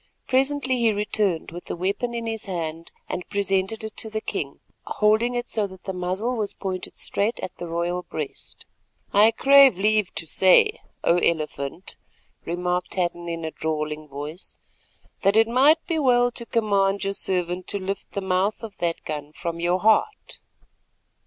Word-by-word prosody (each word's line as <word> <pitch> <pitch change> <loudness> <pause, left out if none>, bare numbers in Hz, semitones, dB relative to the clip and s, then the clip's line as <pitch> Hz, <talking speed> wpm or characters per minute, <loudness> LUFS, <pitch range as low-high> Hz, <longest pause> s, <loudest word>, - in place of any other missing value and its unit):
Presently 265 -1 +1
he 230 -2 +4
returned 205 -5 -1
with 175 +1 -8
the - - -4
weapon 200 +7 -2
in 230 0 -3
his 225 -1 -3
hand 165 -3 -4 0.2
and 180 - -5
presented 200 +1 0
it 220 -1 -6
to 220 - -2
the 220 0 -2
king, 150 -10 -4 0.3
holding 220 +3 +2
it 240 0 -2
so 210 -2 0
that 190 -2 -14
the 190 - -4
muzzle 185 +7 -2
was 210 -3 -3
pointed 185 -2 -5
straight 210 +4 -1
at 180 - -6
the 175 - -6
royal 170 +2 -1
breast. 150 -5 -7 0.5
"I 210 +2 +7
crave 275 -1 +6
leave 210 0 +2
to 165 - -1
say, 190 - +4 0.2
O 170 - +4
Elephant," 155 -1 -2 0.5
remarked 180 +1 -2
Hadden 175 -2 -2
in 165 -1 -4
a 160 - -3
drawling 155 -1 -3
voice, 145 +5 -6 0.6
"that 200 +1 +3
it 225 0 +6
might 280 +7 +4
be 330 -2 -1
well 245 -3 +3
to 235 0 -7
command 200 -3 +1
your 195 0 -1
servant 180 -2 +1
to - - -1
lift 195 0 -5
the 200 - -2
mouth 190 +4 0
of 215 -3 -8
that 170 -1 -2
gun 150 -1 -5
from 170 0 -5
your 175 +2 +1
heart." 220 - +1
195 Hz, 170 wpm, -24 LUFS, 175-225 Hz, 0.6 s, I